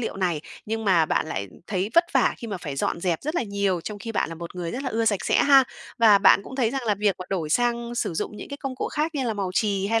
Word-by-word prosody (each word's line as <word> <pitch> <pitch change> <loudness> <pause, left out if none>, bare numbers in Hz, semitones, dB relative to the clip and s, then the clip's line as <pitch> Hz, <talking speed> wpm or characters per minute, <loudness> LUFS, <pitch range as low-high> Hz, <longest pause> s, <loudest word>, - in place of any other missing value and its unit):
liệu 225 - -3
này, 180 -5 0 0.3
nhưng 225 +1 -3
mà 175 -6 +4
bạn - - 0
lại, 100 -10 -3
ừm, - - -18
thấy 195 +1 -2
vất 335 - +6
vả 265 -3 +3
khi 235 - -8
mà 205 -3 -4
phải 145 -5 -6
dọn 170 - -1
dẹp 170 -3 0
rất 305 +3 -3
là 345 - +1
nhiều 200 -4 -1
trong 205 +5 -6
khi 225 +2 -6
bạn - - 0
là 165 - -6
một 170 +1 -8
người 175 -2 -4
rất 260 - -4
là 270 - -2
ưa 230 -1 0
sạch 205 -4 +1
sẽ - - +3
ha, 275 -2 +7 0.3
và 215 -3 +7
bạn 200 - +6
cũng 260 - -9
thấy 240 -4 +2
rằng 270 +1 -3
là 210 - +3
việc 205 -1 +1
mà 185 - -6
đổi 170 -6 -2
sang 235 +2 0
sử 205 - -2
dụng 210 - -3
những - - -8
cái 280 - -6
công 270 -2 -5
cụ - - -2
khác 315 +2 -2
như 275 -3 -1
là 225 -3 -1
màu 195 -3 -2
chì 200 -1 +1
hay 225 +2 +2
210 Hz, 310 wpm, -25 LUFS, 185-240 Hz, 0.3 s, ha